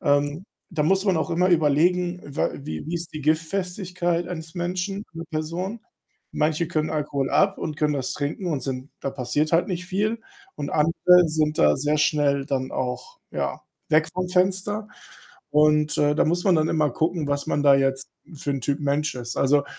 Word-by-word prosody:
Ähm, 145 +4 +1 0.3
da 165 -5 0
muss 190 +5 +2
man 190 -4 +2
auch - - -1
immer 180 +2 +2
überlegen, 175 +3 +2
wa 145 - -1
wie 80 - -6
wie 165 - -3
ist 170 0 -4
die 155 - -5
Giftfestigkeit 175 +2 -1
eines 160 -2 -7
Menschen, 185 +3 -3
einer 165 0 -6
Person. 170 +8 -3 0.5
Manche 155 +2 +1
können 155 -1 -1
Alkohol 145 -3 -1
ab 195 0 +2
und 155 -2 -4
können 150 0 +1
das 135 -3 -2
trinken 150 +6 -3
und 150 -6 -1
sind 130 0 -4
da 135 - -2
passiert 135 +4 -1
halt 170 +2 +3
nicht 180 -1 -3
viel. 210 +4 -1 0.4
Und 145 - -5
andere 170 +3 +4
sind 155 -1 0
da 75 0 +5
sehr 150 +2 0
schnell 145 -2 +2
dann 130 -2 -2
auch, 130 - -4
ja, - - -3 0.3
weg 155 +1 +4
vom 185 -1 -2
Fenster, 190 +4 +1 0.6
und, 150 0 +3
äh, 145 0 +3
da - - +3
muss 175 +3 0
man 190 - +4
dann 155 0 +2
immer 155 -2 +2
gucken, 160 +2 -1
was 145 0 -1
man 145 - 0
da 140 -1 +7
jetzt 135 0 +1 0.3
für 145 0 -4
'n 135 -3 -2
Typ 140 +3 -1
Mensch 145 +1 0
ist. 120 -1 -6
Also, 140 +1 +3
155 Hz, 190 wpm, -24 LUFS, 145-180 Hz, 0.6 s, da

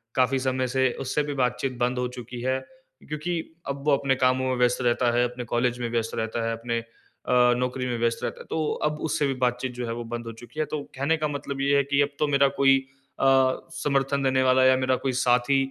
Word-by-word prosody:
काफ़ी 130 +1 +2
समय 130 0 0
से 130 0 +1
उससे 135 +3 0
भी 145 0 -3
बातचीत 125 0 -1
बंद 125 +1 0
हो 125 - 0
चुकी 120 0 -7
है। 130 +1 0 0.5
क्योंकि 150 +4 -3 0.3
अब 140 0 -4
वो 150 - +3
अपने 135 -1 +1
कामों 130 0 +2
में 130 - +1
व्यस्त 125 +1 +2
रहता 120 0 +2
है, 120 +1 +2
अपने 125 0 -7
कॉलेज 120 +1 0
में 120 - -2
व्यस्त 115 -1 -1
रहता 115 +1 -2
है, - - 0
अपने 115 0 -2
अ, 125 +1 0
नौकरी 125 0 -2
में 120 -1 -2
व्यस्त 115 0 0
रहता - - -3
है। - - -11
तो 160 -1 -1 0.2
अब 150 0 -1
उससे 150 -1 0
भी 135 - 0
बातचीत 125 +1 0
जो 125 0 -4
है 115 - -2
वो 120 - -5
बंद 120 0 -5
हो 115 - -5
चुकी 135 +6 -10
है। 155 - +2
तो 150 -2 -2
कहने 140 +5 +1
का 155 - -1
मतलब 140 -1 -4
ये 140 +1 +3
है 140 - +3
कि 140 +1 +1
अब 145 - +2
तो 150 - +2
मेरा 140 -1 +4
कोई 135 -1 +6 0.4
अ, - - +1 0.5
समर्थन 135 +1 0
देने 130 0 +2
वाला 130 0 +4
या 130 0 +6
मेरा 130 0 +1
कोई - - +2
साथी 125 +1 +3
130 Hz, 240 wpm, -25 LUFS, 125-140 Hz, 0.5 s, कोई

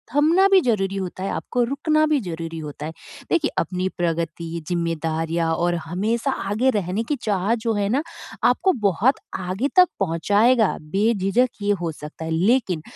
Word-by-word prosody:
थमना 330 +7 +5
भी 385 - +7
ज़रूरी 195 -6 0
होता 185 -1 -4
है, 195 - -2
आपको 245 - -1
रुकना 305 +5 +1
भी 305 -2 +2
ज़रूरी 165 -1 -5
होता 150 -1 -7
है। 160 - -5 0.4
देखिए 340 - +2
अपनी 180 +3 -1
प्रगति 165 -1 -2
ज़िम्मेदारियाँ 165 -1 -1
और 175 +1 0
हमेशा 220 - -1
आगे 220 +3 0
रहने 205 -1 -1
की 295 - +2
चाह 205 +1 0
जो 225 0 -1
है 205 -1 0
ना 275 +7 +1 0.4
आपको 380 - +3 0.2
बहुत 220 +9 +2 0.2
आगे 190 +8 -1
तक 365 -1 +8
पहुँचाएगा। 205 +7 +2
बेझिझक 200 +7 +1
ये 205 - +1
हो 165 -2 -1
सकता 150 +1 -9
है। 160 - -4
लेकिन 185 -1 +2
195 Hz, 160 wpm, -22 LUFS, 165-240 Hz, 0.4 s, तक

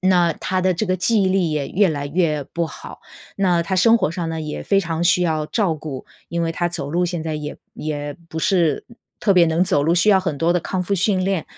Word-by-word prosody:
那 180 -2 +3
他 185 +4 -2
的 185 - +3
这 195 +4 -2
个 185 0 +1
记 215 +3 +2
忆 190 - +2
力 185 -3 +1
也 150 -2 -2
越 200 +2 +3
来 145 -2 -3
越 155 -2 0
不 170 +4 -3
好， 155 - -11 0.4
那 180 -4 +2
他 185 +3 -2
生 230 +5 +5
活 190 - 0
上 170 -1 -3
呢， 160 0 -4
也 150 -1 -5
非 195 -1 +2
常 165 -1 -2
需 175 +1 +4
要 160 -3 0
照 180 0 0
顾。 150 -4 -7 0.2
因 170 0 -1
为 165 - 0
他 175 +1 -1
走 145 -5 -4
路 175 +2 +1
现 175 -2 -3
在 160 -1 -3
也 150 0 -6 0.2
也 145 -1 -4
不 160 - -4
是 170 -3 +1
嗯， 235 - -17 0.2
特 200 -3 +3
别 175 - +6
能 165 +2 +1
走 145 -5 +2
路， 165 +3 +2
需 175 +4 +2
要 195 -2 +6
很 165 -6 -3
多 170 +4 +2
的 - - +3
康 185 +2 -2
复 200 +3 -1
训 190 0 +1
练。 190 -4 -1
175 Hz, 275 characters per minute, -21 LUFS, 155-185 Hz, 0.4 s, 别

